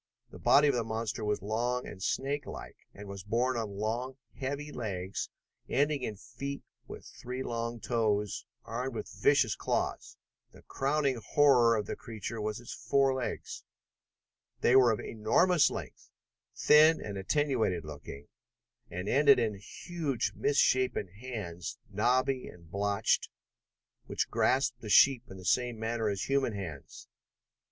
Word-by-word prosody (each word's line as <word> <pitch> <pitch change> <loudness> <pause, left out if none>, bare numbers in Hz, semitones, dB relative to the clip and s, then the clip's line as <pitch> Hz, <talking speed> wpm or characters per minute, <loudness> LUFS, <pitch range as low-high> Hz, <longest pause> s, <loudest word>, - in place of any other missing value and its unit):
The - - -11
body 145 +1 +5
of 140 - +3
the 120 -2 0
monster 110 0 -3
was 105 -2 -1
long 120 +4 -1
and 95 - -9
snakelike, 140 +7 -4
and 100 0 -11
was 100 -1 -7
borne 120 +5 0
on 105 -4 -4
long, 120 +5 -2 0.2
heavy 145 +2 -4
legs 95 -6 -4 0.4
ending 145 0 +1
in 110 -4 -3
feet 125 +6 -7 0.2
with - - -9
three 125 +2 -6
long 115 -1 -3
toes, 105 -3 -1 0.2
armed 125 +2 -4
with - - -4
vicious - - +4
claws. - - -2 0.4
The - - -16
crowning 135 -3 0
horror 125 -5 +5
of 105 -2 -1
the - - -4
creature 110 0 -6
was 105 +1 -2
its 120 - -8
forelegs. 135 -2 -1 1.0
There 130 +2 +6
were 125 -2 +5
of 110 - -1
enormous 145 +10 +3
length, - - -8 0.5
thin 155 +2 +6
and 100 -1 -6
attenuated 110 - 0
looking, 75 -1 -9 0.6
and 90 +3 -5
ended 140 +3 +6
in 115 -3 +1
huge 135 - -3
misshapen 130 -7 +2
hands, 100 -5 -6
knobby 125 +5 +1
and 85 -2 -14
blotched, 100 +2 +1 0.8
which - - -2
grasped 125 -2 +1
the 110 - -7
sheep 125 +4 +6
in 95 - -9
the 90 - -11
same 120 +4 +1
manner 110 0 -1
as 100 -1 -2
human 135 -4 +1
hands. 85 -9 -8
115 Hz, 140 wpm, -31 LUFS, 105-130 Hz, 1.0 s, There